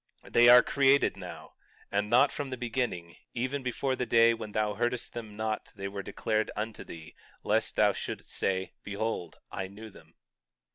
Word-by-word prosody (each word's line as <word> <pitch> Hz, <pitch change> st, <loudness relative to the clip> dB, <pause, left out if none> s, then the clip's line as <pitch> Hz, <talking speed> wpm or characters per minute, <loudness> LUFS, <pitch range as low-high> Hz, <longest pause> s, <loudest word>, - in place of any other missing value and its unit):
20:7 -, -, -14 dB
They 120 Hz, 0 st, +7 dB
are 125 Hz, 0 st, +9 dB
created 140 Hz, 0 st, +3 dB
now, 85 Hz, -5 st, -9 dB, 0.4 s
and 105 Hz, +1 st, 0 dB
not 120 Hz, +3 st, +5 dB
from 145 Hz, -2 st, -4 dB
the 130 Hz, -, -4 dB
beginning, 115 Hz, -8 st, -3 dB, 0.2 s
even 130 Hz, +4 st, -1 dB
before 130 Hz, +1 st, -1 dB
the 125 Hz, -1 st, -3 dB
day 115 Hz, 0 st, +5 dB
when 110 Hz, -2 st, -6 dB
thou 105 Hz, 0 st, 0 dB
heardest 120 Hz, +3 st, -2 dB
them 110 Hz, -3 st, -7 dB
not 110 Hz, 0 st, -3 dB
they 100 Hz, -1 st, -4 dB
were 100 Hz, 0 st, -5 dB
declared 110 Hz, +2 st, -1 dB
unto 110 Hz, +1 st, -4 dB
thee, 80 Hz, -1 st, -11 dB, 0.3 s
lest -, -, +1 dB
thou -, -, +4 dB
shouldst -, -, -6 dB
say—Behold 95 Hz, 0 st, -3 dB
I 95 Hz, -, -4 dB
knew 105 Hz, +3 st, -11 dB
them. -, -, -18 dB
110 Hz, 175 wpm, -29 LUFS, 100-120 Hz, 0.4 s, are